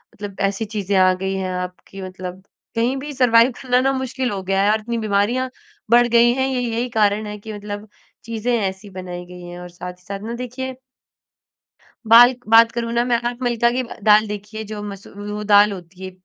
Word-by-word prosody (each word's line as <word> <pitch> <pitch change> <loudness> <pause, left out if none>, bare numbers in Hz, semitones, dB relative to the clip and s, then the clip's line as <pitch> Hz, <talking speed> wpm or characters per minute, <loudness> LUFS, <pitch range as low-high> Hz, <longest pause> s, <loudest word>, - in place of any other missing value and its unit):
मतलब 200 -1 -8
ऐसी 200 +3 -4
चीज़ें 200 -1 0
आ 185 0 +5
गई 190 +1 -3
हैं, 190 -1 -2
आप 180 0 -4
कि 195 - -10
मतलब 185 0 -7 0.3
कहीं 235 +3 +1
भी 295 +2 -6
सरवाइव 245 -2 +5
करना 250 -2 +2
ना, 270 +1 +2
मुश्किल 260 0 -2
हो 195 -1 -3
गया 195 +1 +1
है 205 - +4
और 220 - +2
इतनी 235 +2 -3
बीमारियाँ 220 +5 0 0.4
बढ़ 240 0 +6
गई 235 0 +5
हैं, 265 - +2
ये 260 -1 -1
यही 240 +1 -2
कारण 210 0 +2
है 210 0 -6
कि, 215 +1 -8
मतलब 205 0 -7 0.4
चीज़ें 230 +1 -2
ऐसी 195 0 -4
बनाई 180 -1 -6
गई 180 0 -11
हैं 175 0 -9
और 180 0 -9
साथ 180 +1 -8
ही 180 0 -26
साथ 200 +1 -5
ना, 230 - -4
देखिए 255 +2 -5 1.4
बाल्क 245 +2 +7
बात 230 +1 +6
करूँ 235 -1 -3
ना 235 0 +2
मैं, 245 -1 +2
आप 240 +1 -3
मिल्का 235 -1 +2
की 255 +2 -1
ब 235 - -9
दाल 215 0 +6
देखिए, 210 +1 -6
जो 210 0 -7
मसू 200 -1 -8 0.2
वो 210 0 -4
दाल 205 0 +6
होती 185 0 -10
है 185 - -5
215 Hz, 215 wpm, -21 LUFS, 195-240 Hz, 1.4 s, बाल्क